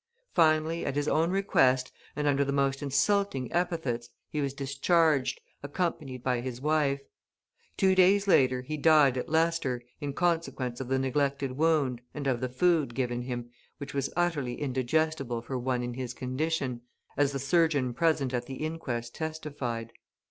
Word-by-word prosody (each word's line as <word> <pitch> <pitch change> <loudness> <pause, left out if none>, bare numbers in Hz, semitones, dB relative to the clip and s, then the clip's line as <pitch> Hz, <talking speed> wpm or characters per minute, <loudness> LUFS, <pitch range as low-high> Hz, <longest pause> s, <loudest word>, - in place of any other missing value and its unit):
Finally, 160 0 +3
at 140 - -2
his 145 0 0
own 165 +2 +2
request, 135 -10 +2 0.2
and 150 0 -2
under 140 0 +3
the 140 - -2
most 140 0 +1
insulting 145 - +1
epithets, 160 -9 -1 0.2
he 150 - -1
was 140 -1 -1
discharged, 140 +2 +1 0.2
accompanied 145 -4 -3
by 125 -2 0
his 125 -1 -5
wife. 145 -1 +1 0.8
Two 190 -1 +4
days 195 +2 +4
later 130 -8 +4
he 155 +3 -4
died 150 -3 +5
at 125 - -3
Leicester, 160 -6 +1 0.2
in 145 -2 -3
consequence 150 -7 -1
of 130 - -5
the 130 +1 +1
neglected 140 0 0
wound 140 -4 +1
and 145 -2 -4
of 130 -3 0
the 130 - -1
food 150 -2 +2
given 120 -2 -1
him, 120 -1 -5 0.3
which 145 -1 -7
was 140 -1 -1
utterly 150 -8 -1
indigestible 135 -1 0
for 130 - -5
one 125 0 -1
in 120 0 -4
his 125 -1 -5
condition, 130 -1 -2 0.3
as 145 0 +2
the 140 - -3
surgeon 140 -2 +2
present 145 -2 +1
at 120 -1 -2
the 135 - -6
inquest 135 -7 -4
testified. 140 -8 -4
140 Hz, 160 wpm, -29 LUFS, 130-160 Hz, 0.8 s, died